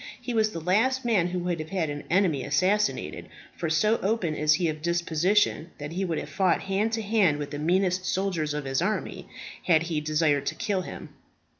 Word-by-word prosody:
He 245 0 -5
was 220 -1 +3
the 170 - -6
last 230 +10 +1
man 205 -7 +2
who 180 +1 -3
would 175 -1 -2
have 155 0 -6
had 170 -6 -1
an 145 0 -6
enemy 170 -7 +2
assassinated; 190 +9 0 0.3
for 165 - -3
so 210 +8 +2
open 195 -5 0
is 150 0 +3
he 170 +1 0
of 155 -1 -3
disposition, 170 +2 +1
that 145 +1 -6
he 185 +4 -2
would 165 -3 -2
have - - -4
fought 190 -3 +2
hand 195 +3 0
to 225 -1 -1
hand 200 -8 +2
with 145 -1 -5
the 145 - -4
meanest 180 +3 +1
soldier 190 -2 -1 0.2
of 150 - -5
his 135 +2 0
army, 210 +4 -3 0.4
had 165 -3 +4
he 165 -3 -2
desired 150 -2 +1
to - - -1
kill 195 -3 -1
him." - - -8
175 Hz, 205 wpm, -26 LUFS, 155-200 Hz, 0.4 s, had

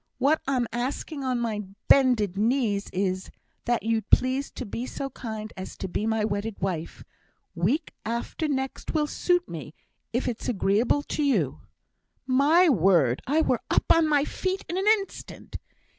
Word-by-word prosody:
What 285 +5 +2
I'm 255 -3 +1
asking 270 +4 -3
on 255 -2 0
my 225 -3 -1 0.3
bended 245 -8 +4
knees 215 -2 +1
is, 185 0 -1 0.4
that 240 0 +1
you'd 225 0 -1
please 260 +2 +3
to - - -6
be 235 +5 -4
so 275 0 -5
kind 220 -3 -6
as 185 0 -8
to 190 - -4
be 210 +4 -2
my 220 -1 +1
wedded 205 0 -3
wife; 175 -4 -3 0.5
week 200 - 0
after 235 +7 -3
next 265 +2 -3
will 305 -1 +3
suit 355 +3 +1
me, 155 -2 -8 0.4
if 245 +3 -1
it's 240 -1 -3
agreeable 230 +5 +2
to 300 - -3
you!' 280 -2 +1 0.6
My 290 +7 +5
word! 170 - +3
I 305 +4 +3
were - - +1
up - - +2
on 330 -1 +3
my 295 -2 +3
feet 375 +4 -3
in 345 - -4
an 385 +2 -1
instant! 425 -2 -1
245 Hz, 160 wpm, -26 LUFS, 205-285 Hz, 0.6 s, My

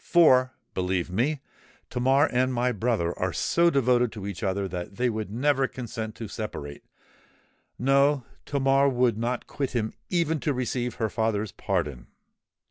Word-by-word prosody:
For, 130 -7 +5 0.2
believe 90 -1 -1
me, 135 +9 0 0.5
Tamar 135 +4 +3
and 130 +1 +2
my 125 0 +1
brother 110 -6 0
are 90 0 0
so 170 - +2
devoted 125 -5 +2
to 105 -3 -7
each 100 -3 -5
other 100 0 -1
that 90 +1 -6
they 125 +1 +1
would 110 -2 -4
never 135 +4 +2
consent 115 -4 -6
to 115 - -6
separate:—no—Tamar 135 - -1
would 125 -4 +1
not 120 +2 -2
quit 140 -2 -3
him 110 -3 -1 0.2
even 165 -3 +1
to 145 0 -1
receive 125 -1 -2
her 115 - 0
father's 110 -3 0
pardon! 65 -5 -2
120 Hz, 140 wpm, -26 LUFS, 105-135 Hz, 0.5 s, For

